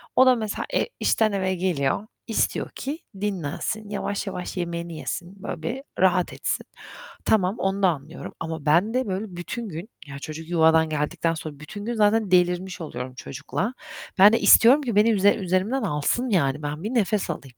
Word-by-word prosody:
o 260 - +7
da 255 -1 +6
mesela 215 -2 -3
e - - +1
işten 220 -1 +2
eve 190 -1 0
geliyor, 175 +1 0 0.2
istiyor 225 - 0
ki 290 +4 -5 0.2
dinlensin, 205 +2 -3
yavaş 205 0 -3
yavaş 180 -1 -5
yemeğini 170 -1 -3
yesin, 185 +4 -6
böyle 170 - -5
bir 250 - -4 0.2
rahat 180 -1 +3
etsin. - - -2 0.6
Tamam, 200 -1 +2
onu 195 +1 -1
da 185 - +6
anlıyorum 155 0 -6
ama 160 -2 -5
ben 175 +10 +3
de 255 -1 0
böyle 195 +2 -2
bütün 215 +6 -5
gün, 170 +7 -7 0.2
ya, 140 0 -8
çocuk 155 +2 -7
yuvadan 160 -1 +4
geldikten 160 +2 -1
sonra 155 -3 -7
bütün 205 +7 -8
gün 240 - -2
zaten 215 -2 +2
delirmiş 180 +1 +2
oluyorum 125 -5 -6
çocukla. 150 - -4 0.5
Ben 205 +3 +9
de - - +3
istiyorum 255 +6 +7
ki 240 -7 -2
beni 215 +2 +5
üze 205 -1 +4
üzerimden 190 +7 0
alsın, 195 - 0
yani, 150 -6 +1
ben 150 +3 -4
bir 215 - -2
nefes 210 -5 +1
alayım. 135 -6 -6
185 Hz, 180 wpm, -24 LUFS, 160-210 Hz, 0.6 s, Ben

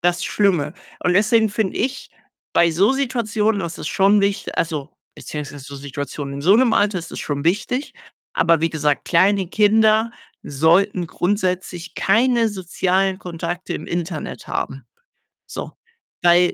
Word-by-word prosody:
das 175 0 +1
Schlimme 175 -7 +1 0.3
und 180 - +2
deswegen 220 +2 +4
finde 205 -1 -2
ich 265 +1 -3 0.4
bei 170 -1 +4
so 195 +9 +3
Situationen, 225 -6 0
das 170 -2 -5
ist - - -4
schon 200 +1 +4
wicht 200 0 -1
also, 155 -3 -2 0.2
beziehungsweise 145 -2 -7
so 140 -1 -9
Situationen 140 0 -6
in 140 - -5
so 190 +5 +5
'nem 240 0 +4
Alter 205 -2 +2
ist 165 -1 -8
das - - -7
schon 140 -1 -3
wichtig. 215 - -1 0.4
Aber 165 -2 +3
wie 165 - +2
gesagt, 150 -2 0
kleine 190 +2 +3
Kinder 220 +2 +3 0.3
sollten 170 +5 +2
grundsätzlich 180 -1 -2
keine 230 +2 +3
sozialen 190 0 0
Kontakte 175 +1 -5
im - - -6
Internet 170 -2 -4
haben. 135 -2 -4 0.6
So. - - -7 0.5
Weil 175 0 +5
185 Hz, 145 wpm, -21 LUFS, 165-210 Hz, 0.6 s, so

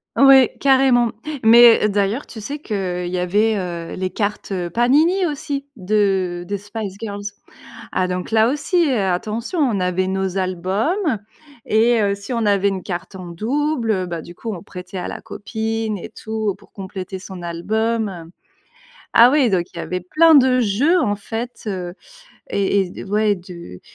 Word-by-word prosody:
Ouais, 270 -2 +6
carrément. 260 -4 +4 0.3
Mais, 235 0 +7
heu, - - +2
d'ailleurs, 205 +5 -1
tu 225 - -9
sais 280 +8 -5
qu'il 185 -7 -3
y 180 +1 -3
avait, 205 +5 +1
heu, 170 -3 -5
les 185 0 -3
cartes, 205 +1 -3
heu, 175 -2 -2
Panini 300 - +3
aussi 285 -2 -3
de 190 -3 0
des 200 0 -3
Spice 205 -1 -6
Girls. 205 -2 -5 0.7
Ah, 185 -1 0
donc 180 0 -4
là 220 0 +4
aussi, 335 +5 +1
heu, 250 - +1
attention, 215 - -2
on 240 -9 +2
avait 180 0 0
nos 190 0 -2
albums 200 - 0 0.5
et 230 +2 +3
heu, 200 -1 +2
si 200 +4 -8
on 230 -3 0
avait 200 -1 +3
une 190 -2 -2
carte 180 +2 -6
en 185 - -8
double, 240 - -1
heu, 185 -3 0
bah, 170 -2 -5
du 175 - -12
coup, 225 +3 -5
on 175 - -7
prêtait 180 -1 -8
à 180 - -4
la - - -6
copine 220 0 -3
et 180 - -8
tout, 220 -1 -3
pour - - -21
compléter 190 -1 -6
son 185 -1 -9
album. 195 +1 -2 0.9
Ah 235 +2 +7
oui, 270 -4 +3
donc, 180 -3 +1
il - - -12
y - - -3
avait 180 +2 -3
plein 315 - +4
de 255 -2 +5
jeux, 250 - +2
en 205 -9 0
fait, 230 +5 -6
heu 180 -4 -4 0.6
et 200 0 +1
et 185 -2 -2
d - - -8
ouais 210 +1 +1
de 170 - -11
205 Hz, 180 wpm, -20 LUFS, 185-235 Hz, 0.9 s, Mais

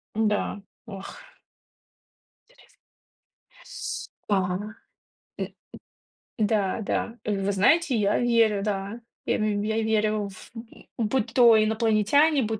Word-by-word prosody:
Да, 210 -1 0 0.2
ох, 195 -4 -9 1.3
интерес. - - -24 0.9
С - - -6 0.2
да. 205 - +3 1.0
Э, - - -2
м - - -4 0.9
м, 215 - +4
да, 205 -1 0
да. 230 +2 -3
Вы 200 -1 -1
знаете, 265 - +3
я 205 -1 +2
верю, 230 -4 +2
да. 200 +2 -3 0.3
Я - - +1
мь 210 -1 0
верю 215 -1 0
в 190 - -13
м 225 0 -12 0.2
будь 260 -2 -1
то 230 -3 +7
инопланетяне, 220 +7 +3
м, 240 - 0
215 Hz, 115 wpm, -25 LUFS, 205-230 Hz, 1.3 s, то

